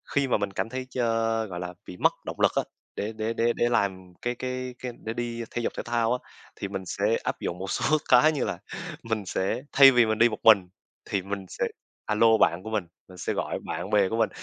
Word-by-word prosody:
khi 140 Hz, -1 st, +3 dB
mà 125 Hz, -, +2 dB
mình 100 Hz, -1 st, -2 dB
cảm 95 Hz, +2 st, -2 dB
thấy 130 Hz, +1 st, -5 dB
chơ 115 Hz, -2 st, 0 dB
gọi 90 Hz, -4 st, -6 dB
là, 90 Hz, 0 st, -5 dB
bị 90 Hz, -, -8 dB
mất -, -, +3 dB
động -, -, -6 dB
lực -, -, +5 dB
á, -, -, +2 dB, 0.3 s
để 105 Hz, +2 st, -3 dB
để 110 Hz, +1 st, -2 dB
để 115 Hz, +1 st, +2 dB
để 120 Hz, -, +1 dB
làm 95 Hz, -5 st, -1 dB
cái 120 Hz, 0 st, -1 dB
cái 130 Hz, 0 st, -4 dB
cái 125 Hz, -, -4 dB
để 110 Hz, -, -2 dB
đi 120 Hz, 0 st, -3 dB
thể 120 Hz, -, -2 dB
dục -, -, -2 dB
thể -, -, -3 dB
thao 120 Hz, 0 st, +1 dB
á, 125 Hz, -, -1 dB, 0.4 s
thì 100 Hz, -, -4 dB
mình 95 Hz, -1 st, -5 dB
sẽ 105 Hz, +5 st, +1 dB
áp -, -, -2 dB
dụng 85 Hz, -, -3 dB
một 95 Hz, +1 st, -4 dB
số 155 Hz, -, +2 dB
cái 125 Hz, +5 st, +7 dB
như 145 Hz, -4 st, -1 dB
là, -, -, -3 dB, 0.4 s
mình 110 Hz, -3 st, -2 dB
sẽ 95 Hz, +6 st, -1 dB
thay 135 Hz, -1 st, +9 dB
vì 120 Hz, -2 st, +5 dB
mình 110 Hz, 0 st, -1 dB
đi 115 Hz, +1 st, +6 dB
một 110 Hz, -, -5 dB
mình, 100 Hz, -5 st, +6 dB, 0.4 s
thì 100 Hz, -, -1 dB
mình 100 Hz, 0 st, -5 dB
sẽ -, -, -2 dB, 0.4 s
a 105 Hz, -, 0 dB
lô 115 Hz, +1 st, +5 dB
bạn 90 Hz, -3 st, +2 dB
của 110 Hz, -, -6 dB
mình, 105 Hz, -5 st, -1 dB, 0.2 s
mình 90 Hz, -, -13 dB
sẽ -, -, -2 dB
gọi -, -, -2 dB
bạn 85 Hz, +4 st, -4 dB
bè 100 Hz, -3 st, +3 dB
của 115 Hz, -, -2 dB
mình. 115 Hz, -1 st, +3 dB
110 Hz, 255 wpm, -27 LUFS, 100-120 Hz, 0.4 s, thay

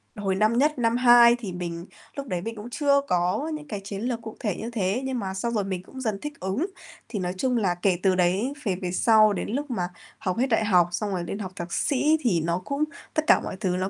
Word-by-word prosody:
hồi 195 Hz, -2 st, -1 dB
năm 215 Hz, +4 st, +2 dB
nhất, 295 Hz, 0 st, +2 dB
năm 230 Hz, 0 st, +2 dB
2 240 Hz, -1 st, +7 dB
thì 195 Hz, -6 st, -5 dB
mình 170 Hz, -1 st, -5 dB, 0.3 s
lúc 280 Hz, -1 st, -5 dB
đấy 180 Hz, -6 st, -2 dB
mình 225 Hz, +4 st, -5 dB
cũng 215 Hz, +2 st, -8 dB
chưa 280 Hz, +2 st, +2 dB
có 180 Hz, -, +1 dB
những 300 Hz, -1 st, -7 dB
cái 205 Hz, -, -4 dB
chiến 200 Hz, 0 st, -6 dB
lược 235 Hz, -1 st, -2 dB
cụ 220 Hz, -1 st, -8 dB
thể 205 Hz, -6 st, -1 dB
như 230 Hz, +2 st, -5 dB
thế, 205 Hz, +1 st, 0 dB
nhưng 260 Hz, -2 st, -2 dB
mà 190 Hz, -3 st, -3 dB
xong 235 Hz, +5 st, -2 dB
rồi 210 Hz, -, +1 dB
mình 190 Hz, -2 st, -4 dB
cũng 260 Hz, +7 st, -10 dB
dần 215 Hz, -5 st, -2 dB
thích 295 Hz, -1 st, -7 dB
ứng. 190 Hz, -, -1 dB, 0.4 s
Thì 210 Hz, -, -3 dB
nói 180 Hz, -1 st, -2 dB
chung 250 Hz, +4 st, +1 dB
là 190 Hz, -6 st, +1 dB
kể 175 Hz, 0 st, +1 dB
từ 190 Hz, -1 st, +4 dB
đấy 190 Hz, +9 st, +1 dB
về 195 Hz, -5 st, 0 dB
về 180 Hz, -1 st, -4 dB
sau, 215 Hz, +2 st, +5 dB
đến -, -, -3 dB
lúc 280 Hz, +5 st, -3 dB
mà 180 Hz, -7 st, -1 dB, 0.3 s
học 185 Hz, -1 st, -2 dB
hết 255 Hz, +3 st, +2 dB
đại 225 Hz, -2 st, +2 dB
học 180 Hz, -4 st, +4 dB
xong 205 Hz, +3 st, -2 dB
rồi 180 Hz, -2 st, -2 dB
lên 195 Hz, +4 st, -5 dB
học 190 Hz, -3 st, -5 dB
thạc 175 Hz, 0 st, -6 dB
sĩ 295 Hz, +3 st, +2 dB
thì 190 Hz, -, +2 dB
nó 170 Hz, +2 st, 0 dB
cũng 280 Hz, +2 st, -1 dB, 0.3 s
tất 310 Hz, -, +1 dB
cả -, -, +6 dB
mọi -, -, -5 dB
thứ 185 Hz, -4 st, 0 dB
nó 190 Hz, +1 st, -1 dB
210 Hz, 265 wpm, -25 LUFS, 185-245 Hz, 0.4 s, 2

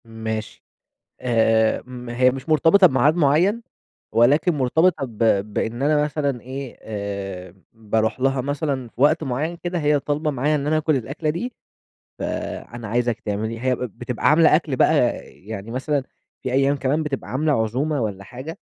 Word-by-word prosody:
ماشي 110 Hz, -1 st, -5 dB, 0.6 s
آآ، 115 Hz, -2 st, +2 dB
ما 125 Hz, -1 st, -8 dB
هي 125 Hz, +1 st, +5 dB
مش 135 Hz, +2 st, -7 dB
مرتبطة 165 Hz, +5 st, +6 dB
بميعاد 145 Hz, 0 st, +3 dB
معيّن 175 Hz, +9 st, +3 dB, 0.5 s
ولكن 140 Hz, +10 st, +4 dB
مرتبطة 150 Hz, +3 st, +2 dB
ب 115 Hz, -4 st, -13 dB, 0.4 s
بإن 120 Hz, +4 st, -2 dB
أنا 150 Hz, +1 st, +3 dB
مثلًا 140 Hz, -4 st, -2 dB
إيه 130 Hz, 0 st, -7 dB
آآ، 100 Hz, -4 st, -6 dB, 0.2 s
باروح 110 Hz, 0 st, -1 dB
لها 135 Hz, 0 st, +1 dB
مثلًا 140 Hz, -2 st, -2 dB
في 120 Hz, -, -9 dB
وقت 155 Hz, +3 st, +4 dB
معيّن 150 Hz, +6 st, -2 dB
كده، 175 Hz, 0 st, -2 dB
هي 150 Hz, -1 st, +2 dB
طالبة 150 Hz, +2 st, -1 dB
معايا 145 Hz, +3 st, +1 dB
إن 145 Hz, -1 st, -2 dB
أنا 155 Hz, +1 st, +2 dB
آكل 155 Hz, -1 st, +1 dB
الأكلة 140 Hz, +5 st, -3 dB
دي، 195 Hz, +11 st, -3 dB, 0.7 s
فأنا 120 Hz, -1 st, -5 dB
عايزِك 120 Hz, +1 st, 0 dB
تعمليها، 110 Hz, +2 st, -3 dB
هي 130 Hz, -1 st, +2 dB
بتبقى 120 Hz, 0 st, -2 dB
عاملة 155 Hz, 0 st, +6 dB
أكل 155 Hz, -4 st, -1 dB
بقى -, -, +4 dB, 0.3 s
يعني 105 Hz, +1 st, -9 dB
مثلًا 140 Hz, +3 st, -1 dB, 0.4 s
في 130 Hz, -, -2 dB
أيام 135 Hz, +2 st, +3 dB
كمان 140 Hz, +4 st, 0 dB
بتبقى 145 Hz, -3 st, -4 dB
عاملة 150 Hz, +4 st, +1 dB
عزومة 135 Hz, +6 st, -1 dB
والَّا 100 Hz, -3 st, -3 dB
حاجة، 130 Hz, -, -8 dB
130 Hz, 155 wpm, -22 LUFS, 115-150 Hz, 0.7 s, مرتبطة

